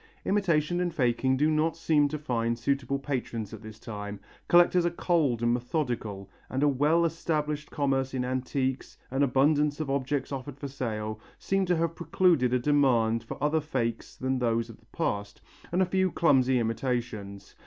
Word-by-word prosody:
Imitation 175 -4 +1
and 175 -1 -2
faking 130 0 +2
do 150 +3 +3
not 155 +2 +1
seem 155 -3 +3
to 155 +2 -4
find 115 -5 -1
suitable 140 +2 -1
patrons 120 -6 -4
at 110 - -8
this 110 -1 -10
time. 105 -2 -7 0.3
Collectors 175 0 +5
are 175 - +2
cold 160 -9 +1
and 120 0 +3
methodical, 120 - -3 0.2
and 130 +2 -1
a - - +5
well 150 +5 +3
established 150 -2 -2
commerce 135 -2 0
in 125 -1 -1
antiques, 130 +1 -2
an 135 +2 0
abundance 145 +2 +3
of 150 -3 -2
objects 140 0 -1
offered 135 0 -5
for 140 - -5
sale, 110 -5 -4 0.2
seem 195 -1 0
to 180 - +3
have 165 0 0
precluded 165 -5 +2
a 125 - +3
demand 120 -5 +2
for - - -7
other 155 +2 +2
fakes 120 -6 -3
than 130 0 -1
those 115 -1 0
of - - -16
the - - -27
past, 100 0 -3 0.3
and 180 +2 +3
a - - +2
few 190 0 +1
clumsy 130 -6 +3
imitations. 115 -4 -3
135 Hz, 175 wpm, -28 LUFS, 120-155 Hz, 0.3 s, Collectors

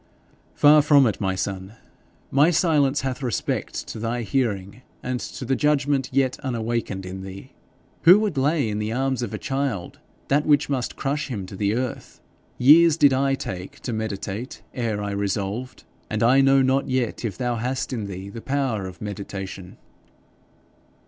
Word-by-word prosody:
'Far 150 +1 +7
from 145 -2 +5
it, 110 -3 -1
my 95 -1 0
son. 95 +1 -4 0.6
My 145 +4 +5
silence 150 -5 +2
hath 130 -1 -3
respect 120 -7 -2
to - - -7
thy 115 +2 -2
hearing 105 -2 -2 0.2
and 125 -1 -2
to 130 - -7
the 135 +2 +1
judgment 145 -2 +1
yet 130 -1 +1
unawakened 115 -6 -2
in 95 +1 -6
thee. 95 +7 -9 0.5
Who 180 +4 +8
would 210 -6 -1
lay 140 0 +1
in 105 0 -2
the 105 +1 -2
arms 130 +1 -1
of 120 -4 -3
a 105 - -3
child 135 -8 -3 0.3
that 145 +2 +2
which 150 -1 +3
must 130 -3 -2
crush 145 +2 -2
him 105 -8 -4
to 95 - -9
the 100 +2 0
earth? 125 0 -4 0.4
Years 155 +5 +6
did 145 -4 +5
I 135 +1 +2
take 90 -7 -7
to 120 - -4
meditate 110 +2 -5
ere 110 -4 -2
I 100 - -3
resolved, 100 +4 -3 0.3
and 110 +1 -1
I 130 +4 +5
know 135 0 +5
not 135 +1 +1
yet 130 -3 -1
if 110 -4 -3
thou 120 -2 -1
hast 130 +3 -2
in 110 -5 -3
thee 95 0 -7
the 115 +3 -8
power 130 -8 -1
of 90 -1 -11
meditation.' 95 -2 -7
125 Hz, 170 wpm, -23 LUFS, 100-135 Hz, 0.6 s, Who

